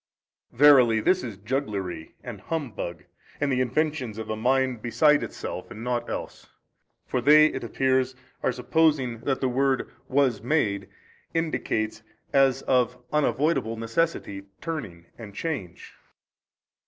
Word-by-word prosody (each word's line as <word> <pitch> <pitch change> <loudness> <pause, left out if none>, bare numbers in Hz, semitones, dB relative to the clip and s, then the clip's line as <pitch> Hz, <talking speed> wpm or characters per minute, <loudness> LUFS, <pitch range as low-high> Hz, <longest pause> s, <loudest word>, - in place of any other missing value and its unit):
A. - - -25
Verily 125 -5 +6
this 185 - +2
is 110 -5 -6
jugglery 100 - -4
and - - -8
humbug 115 - -4 0.4
and 145 -1 0
the 130 -1 +2
inventions 130 -3 -1
of 110 -1 -5
a - - -1
mind 130 +1 +1
beside 150 +5 +3
itself 90 - -6
and 115 -1 -8
nought 120 -1 -2
else. - - -6 0.6
For 125 - -1
they 150 +4 +7
(it 135 -4 -1
appears) 130 +2 +1 0.3
are - - +1
supposing 130 -2 +1
that 135 +3 -2
the 130 - +2
word 135 +1 0 0.2
Was 130 -6 +2
made 115 -6 0 0.5
indicates 110 -9 -1 0.3
as 135 -1 +3
of 125 -1 +2 0.2
unavoidable 150 -5 +1
necessity, 115 -4 -2
turning 110 - -6
and 105 -3 -10
change. 100 - -5
125 Hz, 130 wpm, -26 LUFS, 110-145 Hz, 0.6 s, they